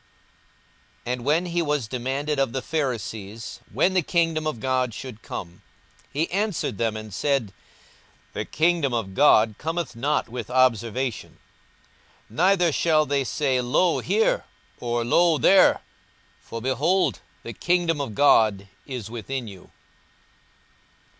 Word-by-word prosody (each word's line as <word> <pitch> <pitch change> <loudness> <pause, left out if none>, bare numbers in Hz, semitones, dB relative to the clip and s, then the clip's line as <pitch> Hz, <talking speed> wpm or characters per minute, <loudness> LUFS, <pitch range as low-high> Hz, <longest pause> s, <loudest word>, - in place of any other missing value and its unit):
42:017:020 125 - -1
And 125 -1 -6
when 160 +5 +2
he 175 0 -1
was 150 -7 -1
demanded 135 +5 -2
of 135 -4 0
the 130 - -3
Pharisees, 115 - -4
when 185 - +2
the 185 - +3
kingdom 165 -2 0
of 150 -7 -3
God 130 -1 0
should 120 -4 -8
come, 85 0 -8 0.5
he 155 +4 0
answered 195 - -1
them 110 -2 0
and 110 -2 -9
said, 135 -5 0 0.8
The - - -3
kingdom 160 -5 +1
of 100 -5 -3
God 110 -3 +5
cometh 165 -3 -3
not 140 +6 0
with 120 -1 -6
observation: 125 -1 0 0.9
42:017:021 - - -14
Neither 180 -2 +4
shall 155 0 +2
they 140 0 0
say, 130 -1 0
Lo 160 +8 +2
here! 210 +5 +1 0.3
or, 120 -1 -2
lo 170 +6 +4
there! 190 +5 +5 0.6
for, 115 0 -8
behold, 145 - +1 0.2
the 115 - -7
kingdom 170 - 0
of 115 -7 -5
God 110 -8 +4 0.2
is 120 -6 -6
within 120 +2 -5
you. 95 -3 -12
130 Hz, 135 wpm, -24 LUFS, 115-160 Hz, 0.9 s, God